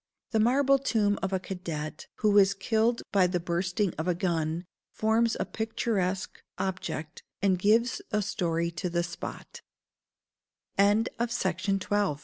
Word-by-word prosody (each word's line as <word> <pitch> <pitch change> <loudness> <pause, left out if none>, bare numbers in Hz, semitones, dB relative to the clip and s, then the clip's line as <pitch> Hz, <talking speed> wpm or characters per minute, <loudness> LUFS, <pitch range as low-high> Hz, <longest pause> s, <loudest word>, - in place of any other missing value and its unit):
The 220 - +2
marble 270 +4 +4
tomb 210 -6 +1
of 190 - -1
a 190 - +1
cadet, 170 -5 -5
who 215 - +2
was 200 -1 +5
killed 225 +3 +1
by 190 -3 +4
the 180 0 -1
bursting 175 +2 -1
of 160 - -2
a 180 - +2
gun, 170 -1 -1 0.3
forms 225 +1 +2
a - - 0
picturesque 205 -4 -2 0.2
object, 180 -4 -4 0.2
and 190 -2 +3
gives 225 +5 +3
a 210 -1 0
story 170 -4 -1
to 170 +2 -3
th 170 0 -2
190 Hz, 125 wpm, -28 LUFS, 175-220 Hz, 0.3 s, was